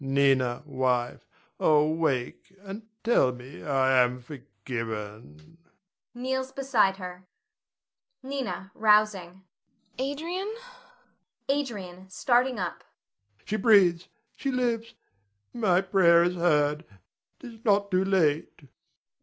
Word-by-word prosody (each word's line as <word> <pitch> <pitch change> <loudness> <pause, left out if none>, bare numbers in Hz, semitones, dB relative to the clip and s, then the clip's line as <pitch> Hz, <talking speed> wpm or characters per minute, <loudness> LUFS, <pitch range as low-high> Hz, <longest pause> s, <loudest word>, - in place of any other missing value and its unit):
Nina, 135 -2 +2
wife, 130 -3 -1 0.3
oh, 150 -1 +4
wake 155 -3 -2
and 200 +2 -7 0.2
tell 215 - +3
me 125 +2 -11
I 130 -3 +3
am 125 +1 -2
forgiven! 115 - -8 0.6
[Kneels 260 +1 -3
beside 235 -9 +1
her.] 180 -1 -9 1.0
Nina 265 -7 -5
[rousing]. 210 -4 +2 0.6
Adrian! 335 +10 -3 0.9
Adrian 200 -10 -3
[starting 245 +5 +1
up]. 180 -3 -4 0.6
She 215 - -2
breathes, 190 -5 +4 0.3
she 275 - -3
lives, 235 -3 -1 0.6
my 190 -6 +2
prayer 185 -3 +4
is 175 +1 +1
heard. 150 -3 +1 0.6
'Tis 230 -3 -12
not 200 -2 +2
too 185 0 +2
late. 165 -7 0
185 Hz, 95 wpm, -27 LUFS, 140-230 Hz, 1.0 s, oh